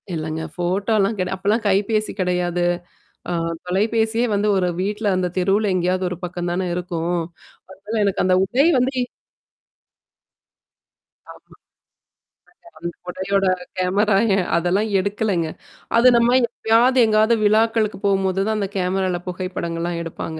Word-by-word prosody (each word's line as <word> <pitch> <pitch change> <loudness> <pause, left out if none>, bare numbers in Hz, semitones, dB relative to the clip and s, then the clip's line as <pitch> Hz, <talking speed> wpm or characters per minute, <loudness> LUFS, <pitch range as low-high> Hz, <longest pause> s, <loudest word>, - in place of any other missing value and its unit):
இல்லங்க 160 0 -3
ஃபோட்டோலா 195 +4 +1
கெடயா 185 0 -2
அப்பல்லாம் 205 +4 0
கைபேசி 210 +2 +1
கிடையாது. 180 -1 0 0.7
ஆ - - -2 0.3
தொலைபேசியே 220 +5 +1
வந்து 205 +1 +1
ஒரு 185 -1 +1
வீட்ல 210 +2 -2
அந்த 185 -1 0
தெருவுல 195 +3 +2
எங்கேயாவது 185 +1 0
ஒரு 180 - -5
பக்கம் 175 0 -4
தானே 185 +2 -1
இருக்கும். 175 -1 -2 0.5
அதனால 205 +4 -4
எனக்கு 200 - 0
அந்த 185 0 +3
உடை 260 +8 +2
வந்து 255 +2 +1 2.4
ஆமா. - - -14 1.3
அந்த 170 - -5 0.2
உடையோட 195 +2 -1 0.3
கேமரா 195 +3 +2 0.4
அதெல்லாம் 180 +6 +1
எடுக்கலங்க. 200 -3 -1 0.5
அது 235 +2 +6
நம்ம 235 +1 +4
எப்பயாவது 235 +2 +2
எங்காவது 215 +1 +3
விழாக்களுக்கு 220 0 +2
போகும்போது 195 -1 +1
தான் 220 0 0
அந்த 200 - -1
கேமரால 185 -1 0
புகைப்படங்கள்லாம் 175 -2 -3
எடுப்பாங்க. 160 -1 -6
195 Hz, 120 wpm, -21 LUFS, 180-215 Hz, 2.4 s, அது